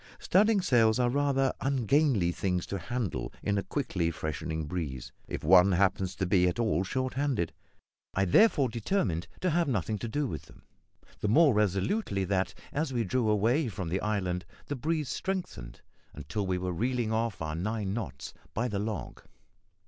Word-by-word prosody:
Studding 205 +1 +3
sails 115 -9 +4
are 125 -1 +2
rather 135 -1 +2
ungainly 135 - +2
things 90 0 -1
to 100 - -4
handle 95 - -3
in 100 -1 +1
a - - -3
quickly 95 - -1
freshening 80 0 -3
breeze, 75 -6 -4 0.2
if - - -5
one 95 +4 +6
happens 95 0 +1
to 95 - -1
be 90 0 +3
at 90 - -1
all 110 -7 +1
short 130 +6 -2
handed. 130 - -1 0.6
I 95 - +2
therefore 140 - +5
determined 110 - -1
to 185 - +1
have 170 0 +2
nothing 110 - -1
to 115 - -4
do 145 +6 -1
with - - -5
them - - -18 0.6
the - - -1
more 145 +6 +5
resolutely 100 - 0
that, 95 0 0 0.2
as 150 0 -1
we 120 -2 0
drew 115 +3 0
away 115 +8 +2
from 95 -6 -4
the 95 +3 -1
island, 95 -4 -1 0.2
the 145 - -3
breeze 155 +2 -1
strengthened 130 - -4 0.3
until 75 +8 -3
we 90 0 0
were 90 0 -2
reeling 120 +3 -1
off 110 -2 -1
our 80 -1 -3
nine 100 +3 -2
knots 70 - -5 0.2
by 120 +3 0
the 105 -4 -2
log. 105 +1 -4
105 Hz, 170 wpm, -29 LUFS, 90-130 Hz, 0.6 s, one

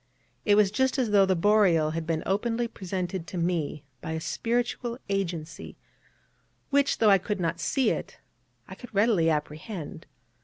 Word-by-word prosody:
It 205 - +5
was 205 -2 +4
just 265 +5 +1
as 245 -5 0
though 200 -2 +5
the 190 - +2
Boreal 175 -5 +3
had 160 0 -4
been 160 -1 -1
openly 230 +4 0
presented 185 -3 -4
to 185 - -6
me 165 -4 -1 0.2
by 160 - -4
a 160 - -2
spiritual 240 +5 -2
agency, 170 -5 -4 0.9
which, 280 0 +3
though 215 -2 +5
I 195 - +6
could 205 +2 -3
not 170 -1 -1
see 265 +8 +1
it, - - -5 0.5
I - - -9
could 245 -4 -12
readily 200 -6 +3
apprehend. 155 +3 -4
190 Hz, 160 wpm, -27 LUFS, 165-220 Hz, 0.9 s, I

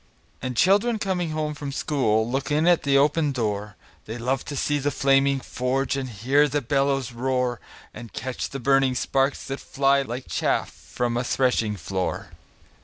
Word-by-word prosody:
And 125 -1 -4
children 205 - +4
coming 185 -5 -1
home 155 -1 -2
from 145 -1 -6
school 115 -7 +1
Look 135 +3 -2
in 150 +2 +2
at 175 -2 +5
the 140 -1 +3
open 145 +1 +3
door; 105 -4 -3 0.3
They 110 +2 -5
love 125 +2 -1
to 145 - -5
see 145 +2 0
the 145 +1 0
flaming 140 -1 +2
forge, 130 +1 -1
And 135 -2 -3 0.2
bear 145 +3 +5
the 145 +1 0
bellows 135 -1 0
roar, 125 0 -1 0.3
And 115 -2 -10
catch 130 -1 -4
the 135 - -6
burning 135 0 +3
sparks 135 +2 0
that 135 0 -4
fly 140 0 +2
Like 125 -1 -5
chaff - - 0
from 120 -1 -3
a 120 - 0
threshing 120 -4 +1
floor. 95 0 -3
135 Hz, 175 wpm, -24 LUFS, 125-145 Hz, 0.3 s, at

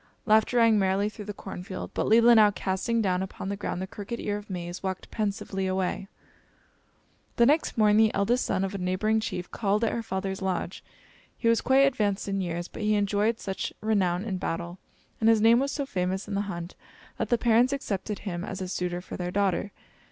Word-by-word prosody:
Laughter 220 +2 +3
rang 230 -2 +5
merrily 195 +2 +1
through 210 -1 -9
the 210 - -4
corn 195 - -8
field, 185 0 -6
but - - -1
Leelinau, 230 -1 +7
casting 200 +5 -1
down 185 -2 +1
upon 190 0 -5
the 200 - -2
ground 200 -3 -4
the 190 - -3
crooked 205 +4 -7
ear 205 - -2
of 210 0 -8
maize, 175 -1 -5
walked 190 -1 -5
pensively 200 -2 -2
away. 185 +1 -1 1.3
The 235 - +5
next 295 +2 +2
morning 210 -1 +5
the 220 0 +4
eldest 235 +6 +2
son 190 - 0
of 195 +1 -2
a 200 - -4
neighboring 185 +5 +1
chief 180 -4 -4
called 210 +1 0
at 225 - +2
her 235 - -2
father's 190 -2 -4
lodge. 185 -1 -3 0.5
He 230 - -1
was 230 -1 +4
quite 265 +1 +5
advanced 210 -8 0
in 195 -1 -1
years; 175 -1 -3
but - - -9
he 215 0 +2
enjoyed 205 +2 +1
such 195 -1 -4
renown 195 -4 +1
in 190 -5 -3
battle, 170 +1 -4 0.4
and 225 - +4
his 225 -1 +5
name 230 +2 +6
was 275 +1 0
so 280 - -2
famous 190 -3 -2
in 205 - -5
the 200 +1 -1
hunt, 170 0 -6 0.5
that - - -1
the 240 - +3
parents 235 +2 +3
accepted 210 -6 -3
him 175 -3 -3
as 195 -1 -5
a 185 - -4
suitor 180 -1 -3
for - - -8
their 180 -1 -3
daughter. 195 +1 0
200 Hz, 210 wpm, -27 LUFS, 185-220 Hz, 1.3 s, Leelinau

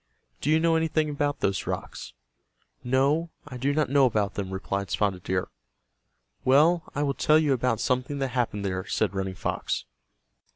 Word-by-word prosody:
Do 145 - -1
you 155 +1 +4
know 165 0 +3
anything 155 -1 +1
about 145 0 -1
those 100 0 0
rocks?" - - -5 0.7
"No, 140 +6 +2 0.2
I 125 -3 -7
do 135 +3 0
not 150 -2 0
know 140 -2 +5
about 105 -4 0
them," 100 -2 -4
replied 95 0 -3
Spotted 95 -2 0
Deer. 90 0 -2 0.9
"Well, 155 +6 +4
I 145 - 0
will 140 -1 0
tell 155 +2 +4
you 150 -3 +3
about 125 -3 0
something 130 +3 -1
that 135 -1 -1
happened 120 -5 -1
there," 95 0 -3
said - - 0
Running 95 -1 -3
Fox. - - -3
130 Hz, 170 wpm, -26 LUFS, 100-150 Hz, 0.9 s, know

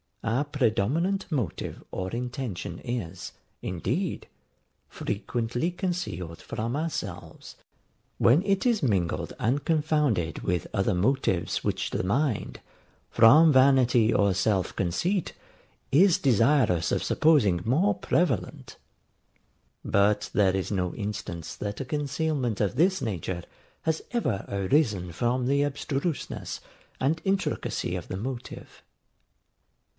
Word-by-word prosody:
Our 120 +6 0
predominant 145 - 0
motive 120 - -3
or 95 0 -3
intention 120 -8 -4
is, 105 -8 -5 0.3
indeed, 125 - -2 0.6
frequently 120 - -2
concealed 155 - -4
from 115 +4 -3
ourselves 100 - -5 0.6
when 140 +10 +4
it 195 +1 +1
is 235 -5 +2
mingled 85 - 0
and 130 +4 0
confounded 150 - +1
with 90 -2 -1
other 95 +1 +1
motives 95 -3 0
which - - -1
the - - -1
mind, 120 +5 -1 0.5
from 150 +8 +7
vanity 130 -4 +5
or 100 -2 +3
self 95 -1 0
conceit, 170 - -1 0.6
is 175 +5 +5
desirous 115 - +3
of - - 0
supposing 120 - +3
more 165 - +2
prevalent: 175 - -1 1.1
but 100 +1 +2
there 95 -2 +3
is 95 +1 -2
no 90 -3 -1
instance 100 -6 -5
that 105 0 -5
a - - -4
concealment 145 -4 -1
of 105 +1 0
this 185 +7 +2
nature 90 -5 -3 0.4
has 160 0 -1
ever 205 - -1
arisen 100 - +1
from 120 +8 0
the 140 +2 +2
abstruseness 145 +2 -3 0.4
and 150 +5 0
intricacy 195 0 -1
of - - -6
the 95 - -4
motive. 120 +4 -7
120 Hz, 110 wpm, -27 LUFS, 95-150 Hz, 1.1 s, from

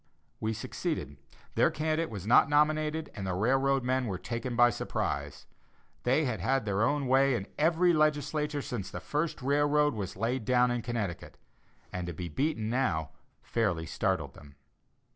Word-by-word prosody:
We 110 +1 -1
succeeded; 70 - -4 0.4
their - - +4
candidate 155 +1 -1
was 100 -4 -7
not 120 +6 +5
nominated, 155 +1 +1
and 100 -3 -5
the 90 - -1
railroad 135 +6 +2
men 130 0 0
were 95 -3 -2
taken 115 +5 -4
by 120 0 +6
surprise. - - -3 0.6
They 135 +5 +3
had 120 -6 -2
had 130 +5 +1
their 100 0 0
own 145 +3 +1
way 135 +1 +4
in 100 - -3
every 170 +3 +4
legislature 150 -1 +1
since 100 -6 -4
the - - -6
first 150 -2 -2
railroad 145 +1 +3
was 100 -5 -5
laid 115 +4 -1
down 125 +1 +3
in 120 -1 -1
Connecticut, 115 -7 -4 0.6
and 90 -1 -3
to 85 - -4
be 85 +2 -5
beaten 120 - -1
now 100 - 0 0.3
fairly 95 -8 0
startled - - -1
them. 70 -1 -15
125 Hz, 160 wpm, -30 LUFS, 105-145 Hz, 0.6 s, by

